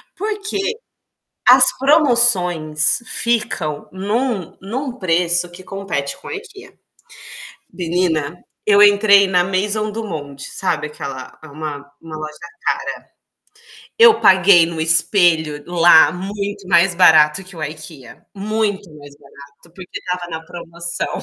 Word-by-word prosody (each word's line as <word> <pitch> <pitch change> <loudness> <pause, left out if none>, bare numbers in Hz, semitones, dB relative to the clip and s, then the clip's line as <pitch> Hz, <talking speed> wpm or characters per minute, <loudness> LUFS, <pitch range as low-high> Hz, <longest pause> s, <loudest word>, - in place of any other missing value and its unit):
Porque 415 +1 -3 0.8
as 255 +1 +8
promoções 200 - +2
ficam 200 -13 0
num 205 0 -3
num 255 +7 -5
preço 175 0 +1
que 175 +2 -13
compete 190 -8 -5
com - - -12
a - - -6
IKEA. 410 -1 -12 1.0
Menina, 170 -2 -2 0.2
eu 205 -1 +3
entrei 205 -1 +5
na 180 -2 +1
Maison 205 +3 -2
do 225 +2 -6
Monte, 145 -8 -8
sabe 150 - -2
aquela 135 -3 -9
é - - -11
uma 150 0 -7 0.2
uma 160 -1 -10
loja 155 0 -8 0.3
cara. - - -4 0.9
Eu 460 -1 +6
paguei 185 -2 +5
num 165 -1 -7
espelho 160 -2 +2
lá 175 -2 +5
muito 200 +1 -6
mais 175 0 +3
barato 160 0 +4
que 185 0 -11
o 160 - -6
IKEA. 155 -3 -9
Muito 205 0 -3
mais 145 -1 -14
barato 140 +3 -18
porque 185 -2 -9
estava 180 -1 -6
na 160 -1 -7
promoção. 170 0 -5
180 Hz, 125 wpm, -18 LUFS, 160-205 Hz, 1.0 s, as